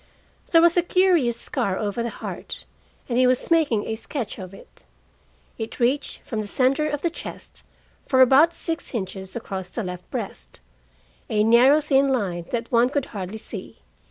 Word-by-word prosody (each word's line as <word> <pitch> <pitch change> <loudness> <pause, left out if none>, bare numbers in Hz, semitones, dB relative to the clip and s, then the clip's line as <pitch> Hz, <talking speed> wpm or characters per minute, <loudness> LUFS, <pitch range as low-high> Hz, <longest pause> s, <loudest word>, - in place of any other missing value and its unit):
There 330 -1 +6
was 340 0 +6
a 350 - +5
curious 345 -9 +2
scar 190 -1 -1
over 210 +2 -2
the 235 - -2
heart, - - -7 0.4
and 245 -1 0
he 255 - +5
was 255 +5 +1
making 290 -11 +3
a 220 - -2
sketch 230 -1 -5
of 185 -1 -8
it. 195 - -16 0.8
It 225 +3 -6
reached 260 +4 0
from 220 -5 -3
the 210 - -6
center 270 +7 +1
of 295 -1 -4
the 340 - +1
chest - - -9 0.4
for 260 - +2
about 270 +6 +7
six 330 -4 -4
inches 190 -2 -5
across 190 -5 -5
the 230 - -4
left 180 -1 -7
breast, - - -6 0.7
a 210 0 +2
narrow 250 +7 +6
thin 275 -2 +3
line 190 -10 -1
that 235 -1 -3
one 240 +1 +4
could 285 -1 -1
hardly 195 +1 -5
see. 220 - -8
240 Hz, 175 wpm, -23 LUFS, 205-285 Hz, 0.8 s, about